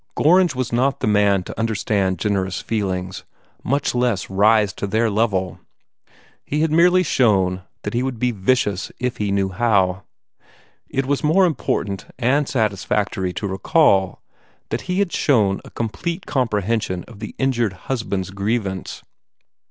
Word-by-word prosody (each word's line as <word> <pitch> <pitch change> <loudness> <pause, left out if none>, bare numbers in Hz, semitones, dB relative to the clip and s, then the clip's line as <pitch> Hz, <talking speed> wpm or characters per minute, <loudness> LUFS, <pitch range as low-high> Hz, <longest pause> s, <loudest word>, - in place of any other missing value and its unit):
Gorringe 175 -1 +4
was 125 -2 -3
not 135 +3 +1
the - - -1
man 105 -3 +3
to - - -8
understand 105 -4 0
generous 95 0 -1
feelings, 95 -4 -3 0.4
much 140 +3 0
less 120 -6 0
rise 105 +1 +3
to 100 - -4
their 110 +2 +1
level. 100 -4 0 0.8
He 150 +1 -2
had 160 -1 +1
merely 180 +3 +5
shown 95 - +2 0.2
that 105 - -4
he 120 - +1
would 130 -2 -3
be 125 +2 +1
vicious 105 -2 0
if 125 -1 -2
he 105 -1 -1
knew 100 -1 +1
how. 95 -2 +1 0.9
It 135 0 -1
was 140 +2 -1
more 175 +6 +4
important 100 - -2
and 135 +4 +1
satisfactory 105 -4 -1
to 100 - -3
recall 95 - +2 0.5
that 115 - -2
he 180 - 0
had 200 -2 +2
also - - -2
shown 105 -9 +2
a - - -12
complete 170 - -4
comprehension 110 -7 -1
of 115 -3 -14
the 110 - -7
injured 120 -6 0
husband's 100 -7 -2
grievance. 100 -1 -3
110 Hz, 150 wpm, -21 LUFS, 95-130 Hz, 0.9 s, merely